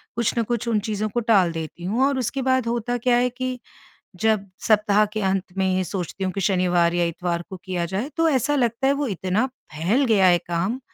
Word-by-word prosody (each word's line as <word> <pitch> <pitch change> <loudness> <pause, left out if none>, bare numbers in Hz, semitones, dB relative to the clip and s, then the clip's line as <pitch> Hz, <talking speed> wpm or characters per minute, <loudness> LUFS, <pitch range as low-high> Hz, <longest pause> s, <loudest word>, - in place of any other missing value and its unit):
कुछ 235 -1 0
ना 230 - +3
कुछ 235 +1 -3
उन 225 -2 +2
चीज़ों 215 0 -2
को 225 - -1
टाल 200 -6 +3
देती 165 +1 -6
हूँ। 225 +8 +1
और 275 -2 0
उसके 265 +2 -2
बाद 260 -2 +1
होता 240 +1 -1
क्या 245 +1 +2
है 250 +1 +2
कि 255 0 -4 0.6
जब 215 -3 +1 0.2
सप्ताह 210 -1 +4
के 215 - -1
अंत 190 -1 +1
में 190 - +2
ये 185 - 0
सोचती 190 +1 -4
हूँ 185 - -1
कि 195 - -3
शनिवार 180 -2 +2
या 175 0 +2
इतवार 170 0 -2
को 190 - -6
किया 180 -3 -2
जाए, 195 - -3
तो 330 0 +3
ऐसा 290 0 +1
लगता 240 0 0
है 275 - +4
वो 285 0 -1
इतना 190 +4 0 0.3
फैल 185 - +1
गया 205 -5 +4
है 175 -1 +5
काम, 185 +9 -1
210 Hz, 225 wpm, -23 LUFS, 185-245 Hz, 0.6 s, है